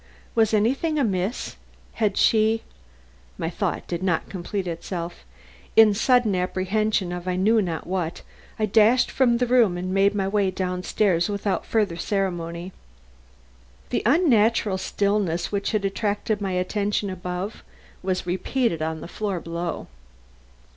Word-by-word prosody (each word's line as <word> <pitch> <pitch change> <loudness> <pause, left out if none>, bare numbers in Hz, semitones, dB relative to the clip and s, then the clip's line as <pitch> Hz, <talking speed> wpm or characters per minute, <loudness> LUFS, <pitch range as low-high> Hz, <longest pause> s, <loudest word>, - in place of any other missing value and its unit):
Was 225 -2 +3
anything 265 +9 +1
amiss? 205 -4 -1 0.4
Had 210 -3 0
she 220 0 +3 0.7
My - - -3
thought - - -2
did 170 0 -3
not 180 -3 0
complete 190 +1 -4
itself. 170 - -5 0.5
In 220 -2 +7
sudden 235 0 +3
apprehension 190 +1 0
of 180 0 -6
I 180 - 0
knew 215 +4 +3
not 170 -5 -3
what, 175 -2 -3 0.3
I 215 - +1
dashed 220 +4 +4
from 245 -3 +3
the 250 - +1
room 235 -7 +3
and 185 +1 -3
made 200 +1 +3
my 195 -2 0
way 200 -1 +1
down 180 -1 -3
stairs 180 -2 +1
without 200 -1 -2
further 210 -7 +1
ceremony. 175 -2 -2 1.2
The - - +1
unnatural 230 - +3
stillness 200 -4 0
which 200 -1 -1
had 215 -3 0
attracted 205 +1 -1
my 195 -2 -2
attention 200 +2 -1
above 180 +2 -5 0.4
was 185 -1 -2
repeated 185 +1 -1
on 160 0 -2
the - - -7
floor 200 0 -3
below. 170 0 -4
195 Hz, 140 wpm, -24 LUFS, 180-215 Hz, 1.2 s, In